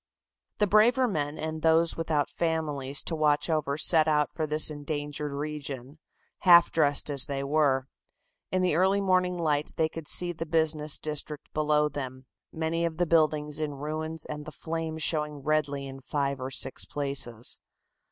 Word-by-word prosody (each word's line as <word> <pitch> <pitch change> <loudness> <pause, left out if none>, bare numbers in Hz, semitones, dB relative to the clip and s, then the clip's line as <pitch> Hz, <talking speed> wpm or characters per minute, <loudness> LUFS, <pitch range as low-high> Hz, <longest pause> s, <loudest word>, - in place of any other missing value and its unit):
The 210 - +3
braver 230 +6 +4
men 150 -7 -2
and 160 0 -4
those 165 +1 +3
without 155 -4 -1
families 150 -5 -2
to 165 - -3
watch 150 +1 +2
over 150 -3 0
set 155 0 +5
out 150 -1 +2
for 155 -2 -2
this 155 +1 +3
endangered 145 0 -4
region, 140 -1 -6 0.4
half 175 -1 +7
dressed 145 -2 +2
as 140 -2 +2
they 140 -1 -3
were. 140 -2 +2 0.7
In 185 0 +1
the 180 - +2
early 190 +3 +3
morning 185 -2 +1
light 150 -3 -1
they 160 - +2
could 160 -1 -9
see 175 -1 +2
the 165 -1 -6
business 155 -1 +1
district 150 -1 -3
below 150 0 +2
them, 130 -3 -6 0.3
many 160 +1 -2
of 165 -1 -2
the 175 - +2
buildings 155 -2 +1
in 150 -2 -3
ruins 155 +2 -4
and 150 -1 -6
the - - -6
flames 160 0 -4
showing 150 -3 -1
redly 145 -2 0
in 135 0 -9
five 140 -1 -2
or 130 - -3
six 130 0 -1
places. 135 -5 -3
155 Hz, 165 wpm, -28 LUFS, 145-160 Hz, 0.7 s, half